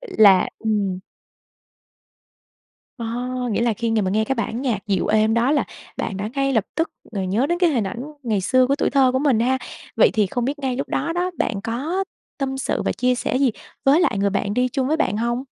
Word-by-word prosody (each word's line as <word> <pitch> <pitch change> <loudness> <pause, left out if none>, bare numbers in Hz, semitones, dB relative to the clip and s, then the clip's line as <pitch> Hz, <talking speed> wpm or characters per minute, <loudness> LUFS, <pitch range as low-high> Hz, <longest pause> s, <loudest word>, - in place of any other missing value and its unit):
là 210 - +5
ừm. 205 -4 -1 2.0
Ờ, 230 - -4 0.4
nghĩa 215 - 0
là 235 -2 +2
khi 230 +1 -2
ng 220 -3 +1
mà 185 - 0
nghe 215 +2 +2
cái 270 - -1
bản 230 +2 -3
nhạc 245 -5 0
dịu 195 -3 0
êm 215 +1 +3
đó 235 +3 +2
là 290 - +2 0.3
bạn 195 - -3
đã 205 +2 -3
ngay 275 0 +1
lập 225 -5 +2
tức 325 +1 0 0.2
ngồi 195 -3 -2
nhớ 220 +9 +1
đến 345 +2 0
cái 350 -3 +4
hình 235 -7 +1
ảnh 235 +5 -5 0.2
ngày 215 -5 0
xưa 255 +7 +3
của 275 +2 +1
tuổi - - 0
thơ 265 -2 +4
của 260 - +1
mình 265 -6 +2
ha. 260 +2 +2 0.4
Vậy - - +6
thì 210 -2 +2
không 240 +5 -2
biết 285 +3 -2
ngay 260 -3 -2
lúc 275 - -3
đó 335 - -1
đó 355 +1 -1
bạn 200 -3 -1
có 295 +13 -2 0.3
tâm 265 -1 -2
sự - - -1
và - - 0
chia 250 +1 +1
sẻ 250 - -1
gì 275 -3 +3 0.3
với 280 +5 +5
lại 335 - +1
người 200 0 +2
bạn 200 +1 -1
đi 250 0 +2
chung 260 +2 -1
với 315 - +2
bạn 210 - 0
hông? 240 +3 -1
245 Hz, 230 wpm, -22 LUFS, 215-275 Hz, 2.0 s, Vậy